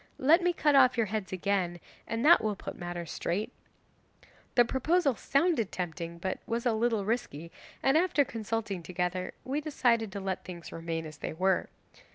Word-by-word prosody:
Let 315 +7 +5
me 355 0 +3
cut 305 -4 +2
off 255 -2 +6
your 230 - +3
heads 210 -1 -4
again, 185 -2 -1 0.3
and 225 +3 -2
that 335 -5 +7
will 215 -1 0
put - - -7
matters 175 -1 -6
straight." 190 +6 -2 1.0
The 240 - +6
proposal 280 +4 +2
sounded 275 - +1
tempting, 170 -1 -4
but 185 +2 -3
was 235 +1 -2
a 240 - +3
little 220 -2 +1
risky, 170 - -3 0.3
and 270 +1 +4
after 320 -4 +3
consulting 220 -5 -3
together 180 +1 -3
we 280 +3 -2
decided 235 -8 +1
to 200 - -4
let 190 -1 -3
things 175 -2 -9
remain 165 -1 -4
as 155 -1 -9
they - - -4
were. 185 +3 +1
215 Hz, 175 wpm, -30 LUFS, 180-260 Hz, 1.0 s, that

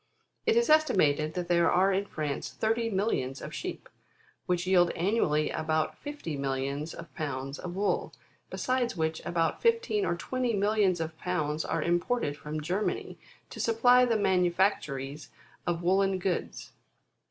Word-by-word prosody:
7. 455 +1 +4
It - - +8
is 475 - +1
estimated 155 - +3
that 180 -1 -2
there 170 -1 +3
are 190 +2 +3
in 200 +1 0
France 150 -5 -3
thirty 230 +1 0
millions 190 - -1
of - - -8
sheep, - - -5 0.6
which 180 0 0
yield 180 -2 +4
annually 170 -5 +1
about 155 0 -1
fifty 290 - -6
millions 140 +3 -3
of 165 -2 -10
pounds 135 -2 -4
of 175 - -6
wocl, 200 +2 0 0.4
besides 255 -5 -1
which 160 0 -1
about 170 -1 0
fifteen 460 -3 +2
or - - 0
twenty 245 +6 -1
millions 200 -3 +2
of 160 0 -4
pounds 155 -4 -1
are - - -1
imported 175 -1 0
from 150 +1 -5
Germany, 185 +7 -2 0.3
to - - -8
supply 245 +2 +5
the 235 -3 +2
manufactories 175 -7 0 0.4
of 170 0 -1
woollen 195 +2 +2
goods. 185 -1 -3
175 Hz, 150 wpm, -29 LUFS, 155-215 Hz, 0.6 s, It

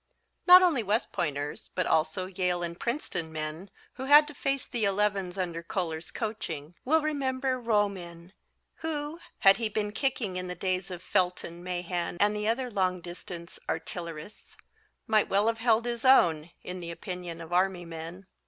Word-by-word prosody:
Not 365 +1 +10
only 325 -9 +3
West 215 +2 0
Pointers, 150 -5 -3
but 185 - +1
also 160 +4 +1
Yale 180 -1 -1
and 170 0 -4
Princeton 190 - -2
men, 155 +4 -5 0.2
who 265 - -6
had 295 +2 +8
to - - -9
face 275 -1 -1
the 235 -2 -2
elevens 195 -2 +1
under 170 -3 -2
Koehler's 170 -2 -3
coaching 170 -9 -4
will 315 +4 +3
remember 265 -3 -1
Romeyn, 190 -6 -1 0.5
who, 310 0 -4 0.2
had 195 0 +7
he 225 -1 -1
been 210 0 -1
kicking 220 -6 -1
in 180 0 -3
the 180 - -4
days 185 +1 -1
of 180 -1 -7
Felton, 180 -1 -1
Mahan 175 -1 -3
and 210 +1 +4
the 210 0 -2
other 245 +2 0
long 185 -3 +1
distance 175 0 -9
artillerists, 165 +2 -6 0.5
might 215 -2 +3
well 200 +2 +3
have 225 0 +1
held 230 0 +3
his 235 -1 -3
own, 170 - +5
in 180 0 -6
the 170 -1 -6
opinion 175 -1 -6
of 165 +1 -8
Army 180 -1 +1
men. 165 +3 -8
185 Hz, 165 wpm, -29 LUFS, 170-230 Hz, 0.5 s, Not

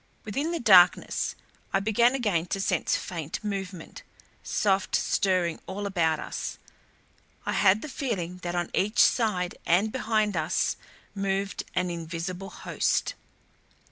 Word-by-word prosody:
Within 275 +10 -2
the 340 - -2
darkness 185 -7 +5 0.4
I 195 - +2
began 225 +5 +3
again 200 -10 0
to 195 - -2
sense 195 - +1
faint 165 -1 -5
movement; 195 -4 -5 0.4
soft 195 -2 +1
stirring 180 -4 +1
all 200 +2 -4
about 165 -5 +1
us. - - -5 0.9
I - - -1
had 200 +1 +3
the - - -5
feeling 195 - -3
that 175 -1 -4
on 175 -1 -2
each 210 +5 0
side 185 -9 +3
and 195 +6 +2
behind 215 -5 0
us 155 -1 0 0.4
moved 195 0 -1
an 180 -1 0
invisible 170 +3 -5
host. - - -1
195 Hz, 130 wpm, -27 LUFS, 175-210 Hz, 0.9 s, darkness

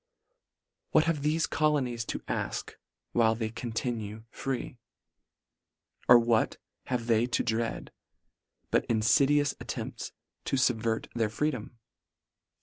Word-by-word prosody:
What 155 - +6
have 165 -2 0
thefe 155 +3 +1
colonies 135 -6 +1
to - - -4
afk, - - -3 0.4
while 115 -2 +3
they 110 -1 -3
continue 110 -2 -4
free? 130 -2 -4 1.3
Or 125 - +10
what 115 -1 +2 0.3
have 125 -2 -1
they 115 0 +3
to 125 - 0
dread, 115 +1 -2 0.8
but - - +3
infidious 140 +6 +3
attempts - - -5 0.3
to - - 0
fubvert 115 -3 +1
their 115 -2 +1
freedom 120 -1 -2
120 Hz, 110 wpm, -29 LUFS, 115-140 Hz, 1.3 s, Or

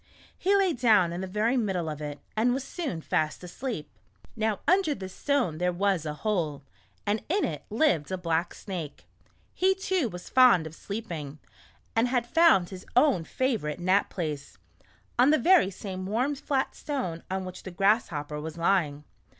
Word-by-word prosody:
He 395 +2 +2
lay 385 -3 +3
down 215 - +4
in 175 - -4
the 190 - -4
very 215 +6 +1
middle 190 -8 0
of 155 -1 -5
it, 145 -1 -5 0.2
and 240 +3 +2
was 265 - -3
soon 275 - -4
fast 155 +2 -1
asleep. 180 - -5 0.5
Now 220 -2 -1
under 365 -4 +3
this 190 -4 -8
stone 255 - 0
there 180 0 +1
was 180 -3 0
a 150 - -3
hole, 160 -9 0 0.4
and 210 +1 0
in 390 +4 +2
it 150 -3 -5
lived 210 - +1
a 185 - -1
black 170 -1 -1
snake. 175 -7 -7 0.5
He, 380 +1 +3
too, 375 - 0
was 180 -2 -9
fond 250 -10 +6
of 160 - -7
sleeping 170 -8 -6 0.6
and 225 +2 +3
had 245 -1 0 0.4
his 190 0 -9
own 250 - +4
favorite 215 - -1
nap 185 +3 +2
place 150 -5 -5 0.3
— - - -25
on 255 +3 +6
the 310 - +5
very 350 - +5
same 185 -1 -6
warm 245 +8 0
flat 275 -1 -1
stone 250 - -4
on 190 0 -2
which 185 0 -8
the - - -7
Grass 195 +5 +2
hopper 150 -1 -5
was 160 +1 -6
lying. 165 -5 +1
195 Hz, 175 wpm, -28 LUFS, 165-250 Hz, 0.6 s, fond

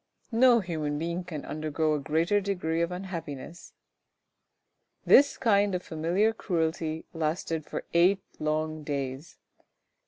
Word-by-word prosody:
No 240 0 +5
human 155 -5 -3
being 170 +3 -3
can 165 -5 -7
undergo 155 0 -1
a 150 - 0
greater 160 +7 +1
degree 180 -4 -1
of 170 +1 0
unhappiness. 170 -4 -7 1.3
This 285 +1 +6
kind 205 -4 +3
of 180 - -3
familiar 175 +8 +1
cruelty 160 -5 -2
lasted 160 -1 -2
for - - -4
eight 180 +3 +4 0.2
long 155 0 -1
days. 140 0 -4
165 Hz, 120 wpm, -28 LUFS, 155-185 Hz, 1.3 s, This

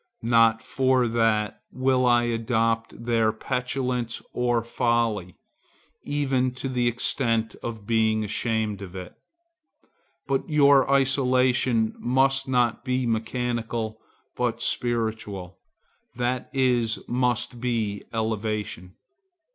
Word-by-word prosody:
Not 115 -1 +4
for 130 -1 +2
that 110 -2 +1
will 130 -1 +2
I 120 0 +4
adopt 115 -1 -1
their 115 -2 +2
petulance 125 0 -2
or 120 -2 +1
folly, 115 -6 0 0.7
even 135 -3 0
to 135 - -4
the 125 -2 0
extent 115 -2 0
of 110 -3 -6
being 110 -1 +2
ashamed 110 -1 -1
of 95 -2 -9
it. 90 -1 -7 1.1
But 135 +2 -1
your 140 -3 +5
isolation 130 -4 +3
must 135 +2 +2
not 125 -2 +1
be 130 -1 0
mechanical, 115 -1 -2 0.4
but - - -1
spiritual, 110 -6 -2 0.6
that 125 +1 -2
is, 125 -4 +2
must 120 0 -1
be 110 -5 -1
elevation. 105 -4 -3
120 Hz, 100 wpm, -25 LUFS, 110-125 Hz, 1.1 s, your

